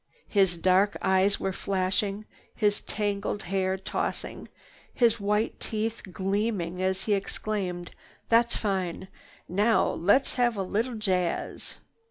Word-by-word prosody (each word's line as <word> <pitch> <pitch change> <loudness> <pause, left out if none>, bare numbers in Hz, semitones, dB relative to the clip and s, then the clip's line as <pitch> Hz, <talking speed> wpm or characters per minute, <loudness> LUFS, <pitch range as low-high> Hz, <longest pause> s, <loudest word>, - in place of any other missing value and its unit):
His 190 -4 +3
dark 190 +3 +3
eyes 190 +1 +3
were 190 - -1
flashing, 195 +2 -1 0.3
his 205 -2 +1
tangled 205 0 -2
hair 190 0 0
tossing, 190 - -4 0.4
his 230 -2 +3
white 210 +2 0
teeth 220 +1 -2
gleaming, 190 -2 -1
as 190 0 0
he 210 - +1
exclaimed: 195 -3 -2 0.4
"That's 235 +1 +4
fine! 190 -3 -2 0.4
Now 210 +5 +3
let's 205 +11 +2
have 240 -3 +1
a 195 - 0
little 225 +6 -1
jazz!" 185 -5 -2
200 Hz, 120 wpm, -27 LUFS, 185-215 Hz, 0.4 s, That's